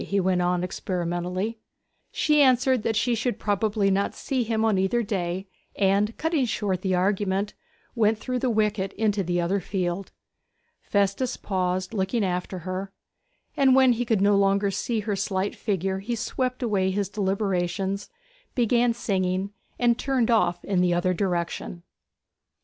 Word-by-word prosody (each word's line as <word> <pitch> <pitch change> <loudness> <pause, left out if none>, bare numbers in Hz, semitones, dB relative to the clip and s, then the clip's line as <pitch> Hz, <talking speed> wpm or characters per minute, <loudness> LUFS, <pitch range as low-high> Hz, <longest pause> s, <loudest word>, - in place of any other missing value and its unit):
he 200 - 0
went 185 -1 +1
on 180 0 +1
experimentally. 180 +4 -3 0.5
She 300 -1 +3
answered 255 -2 +4
that 225 +1 -1
she 240 +3 +2
should 235 -1 -1
probably 205 0 +1
not 195 +1 0
see 260 -2 -2
him 225 -1 0
on 210 -4 +2
either 210 +5 +1
day, 190 -2 -3 0.3
and, 200 +2 +2
cutting 320 -4 +1
short 200 -5 -1
the 185 -1 +1
argument, 195 +2 0 0.4
went 220 -2 +2
through 250 +3 -3
the 255 - 0
wicket 210 -3 0
into 210 -2 0
the 175 0 0
other 180 +4 +1
field. 185 0 -3 0.7
Festus 200 +5 0
paused, 185 -1 -2
looking 200 +2 0
after 180 +1 -2
her; 190 +1 -4 0.6
and 265 -2 +5
when 260 -2 +6
he 240 +1 -1
could 225 -4 +1
no 200 0 +4
longer 200 0 +2
see 220 +3 -1
her 205 -1 -2
slight 195 0 -1
figure 190 -2 -1
he 230 +5 -3
swept 255 +2 -2
away 200 -5 +1
his 200 +1 -1
deliberations, 195 -1 -1 0.5
began 240 -1 +2
singing, 190 -3 -1 0.3
and 240 -1 +2
turned 255 -4 +1
off 175 -6 +2
in 190 -3 +1
the 175 -1 +2
other 185 +1 +1
direction. 175 -2 -2
200 Hz, 155 wpm, -25 LUFS, 185-225 Hz, 0.7 s, when